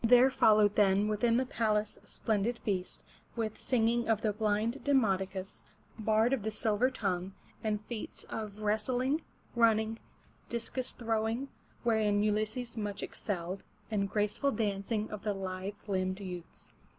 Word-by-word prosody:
There 245 +3 +7
followed 215 -5 +5
then 200 0 +4
within 230 +2 +2
the 260 - +2
palace 215 -3 0
a - - -23
splendid 220 +2 0
feast, 185 -5 -3 0.3
with 220 -2 -2
singing 235 -1 +2
of 220 -1 +3
the 215 -2 +2
blind 215 +4 0
De 285 - +2
mod'o 195 -7 +3
cus, 190 0 -6 0.4
bard 220 +3 +3
of 265 - +1
the 215 - -1
silver 215 +3 +2
tongue, 190 -6 -2 0.3
and 215 -1 -1
feats 230 -3 -6
of 215 -1 -6
wrestling, 250 +8 +1 0.3
running, 225 -1 +3 0.5
discus 240 +2 -2
throwing, 225 +3 -1 0.3
wherein 215 -3 +3
Ulysses 215 +3 -1
much 205 -3 -3
excelled, 185 -1 -4 0.3
and 200 -2 0
graceful 210 +7 +1
dancing 210 -2 -1
of 210 -2 -5
the 205 -1 -1
lithe 190 +1 -4
limbed 185 -1 0
youths. 180 -3 -8
215 Hz, 145 wpm, -32 LUFS, 205-230 Hz, 0.5 s, There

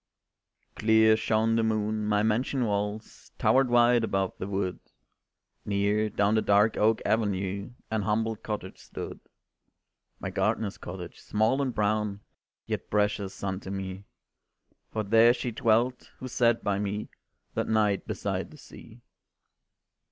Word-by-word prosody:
Clear 110 0 +5
shone 110 +1 +1
the - - +3
moon, 110 -1 0
my 105 0 +2
mansion 120 +4 +1
walls 105 +1 -4
Towered 130 0 +3
white 120 0 +5
above 95 -3 0
the 95 - -4
wood, 95 -2 -2 0.8
Near, 105 +1 +1
down 105 0 +1
the 110 - +3
dark 105 +2 +3
oak 110 +1 +2
avenue 100 0 -1 0.2
An 110 -1 0
humble 110 +2 0
cottage 105 0 -6
stood. - - -8 1.0
My - - -4
gardener's 105 -3 -1
cottage, 90 -1 -8
small 110 +6 +1
and 135 -2 0
brown, 105 -1 0 0.4
Yet - - -4
precious 105 -2 -1
unto 95 0 -3
me; 95 0 -5 0.9
For 110 - -2
there 115 +3 +5
she 125 - -3
dwelt, 120 +2 +1
who 130 - -7
sat 120 -2 +2
by 100 -1 0
me 105 +1 -3 0.4
That - - -1
night 105 -3 +1
beside - - -3
the - - -14
sea. - - -14
105 Hz, 135 wpm, -28 LUFS, 100-115 Hz, 1.0 s, Clear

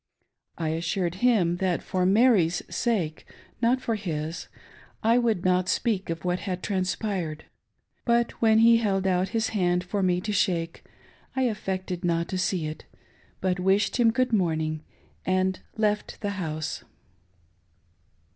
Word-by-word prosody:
I 160 -2 -1
assured 170 +2 -1
him 200 -9 +3
that 180 -2 0
for 185 -1 0
Mary's 200 -5 +4
sake— 190 -11 -1 0.4
not 250 +2 +3
for 230 - -1
his 165 -5 -4 0.3
— - - -26
I 230 +2 +4
would 225 -7 0
not 185 0 +2
speak 205 -6 0
of 165 +1 -4
what 180 0 0
had 185 -2 -4
transpired; 185 -4 -2 0.6
but 235 0 +2
when 220 -1 +5
he 230 +1 +7
held 195 -4 0
out 185 0 +1
his 230 +1 0
hand 180 -4 +1
for 195 +2 -2
me 180 -1 +2
to 210 +3 -3
shake 170 -4 0 0.5
I 265 - +1
affected 190 -6 -2
not 170 -1 0
to 185 - -2
see 180 -3 0
it, 155 0 -6 0.6
but 185 -1 0
wished 195 +5 +2
him 240 -2 +5
good 250 +2 0
morning, 160 -5 0 0.4
and 185 0 +1 0.2
left 210 -1 0
the 205 - -1
house. 155 -6 -4
185 Hz, 145 wpm, -26 LUFS, 175-220 Hz, 0.6 s, he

